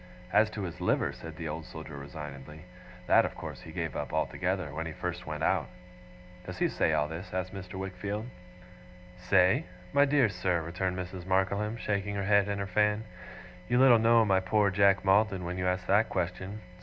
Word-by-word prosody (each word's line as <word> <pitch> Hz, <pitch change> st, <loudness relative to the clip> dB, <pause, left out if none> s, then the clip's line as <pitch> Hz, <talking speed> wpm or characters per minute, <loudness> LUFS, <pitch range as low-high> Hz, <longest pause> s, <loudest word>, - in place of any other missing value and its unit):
As 105 Hz, +1 st, +5 dB
to 105 Hz, -2 st, -5 dB
his 85 Hz, -3 st, -6 dB
liver,' -, -, +1 dB
said 80 Hz, -1 st, -9 dB
the 85 Hz, -2 st, -4 dB
Old 80 Hz, +2 st, -4 dB
Soldier 80 Hz, -1 st, -9 dB
resignedly, 75 Hz, +2 st, -9 dB, 0.4 s
'that, -, -, +5 dB
of -, -, -4 dB
course, -, -, -7 dB
he -, -, -10 dB
gave -, -, -4 dB
up -, -, -4 dB
altogether, 90 Hz, -5 st, -1 dB
when 80 Hz, +2 st, -3 dB
he -, -, -5 dB
first 90 Hz, 0 st, -5 dB
went 75 Hz, -1 st, -4 dB
out!' -, -, +1 dB, 0.7 s
'Does 90 Hz, 0 st, -7 dB
he -, -, +2 dB
say -, -, +1 dB
all 75 Hz, -, +1 dB
this?' 80 Hz, +5 st, -7 dB
asked 95 Hz, 0 st, -3 dB
Mr. 95 Hz, -1 st, -8 dB
Wickfield. 100 Hz, +3 st, -4 dB, 0.9 s
'Say? 90 Hz, 0 st, +3 dB, 0.3 s
My 140 Hz, 0 st, +6 dB
dear 140 Hz, -3 st, +4 dB
sir,' 90 Hz, -3 st, -1 dB
returned 90 Hz, +2 st, -2 dB
Mrs. 90 Hz, 0 st, -6 dB
Markleham, 100 Hz, +4 st, 0 dB
shaking 100 Hz, -2 st, -2 dB
her 100 Hz, -, -2 dB
head 100 Hz, 0 st, +4 dB
and 100 Hz, 0 st, -2 dB
her 100 Hz, -, -2 dB
fan, 105 Hz, +2 st, +1 dB, 0.7 s
'you 120 Hz, -, +3 dB
little 125 Hz, -3 st, +7 dB
know 115 Hz, 0 st, +5 dB
my 95 Hz, -2 st, +3 dB
poor 100 Hz, +2 st, +2 dB
Jack 100 Hz, 0 st, +3 dB
Maldon 95 Hz, -1 st, +3 dB
when 90 Hz, +1 st, -4 dB
you 90 Hz, -, 0 dB
ask 90 Hz, 0 st, -1 dB
that 105 Hz, +3 st, +3 dB
question. 95 Hz, +3 st, -3 dB
95 Hz, 195 wpm, -30 LUFS, 90-105 Hz, 0.9 s, little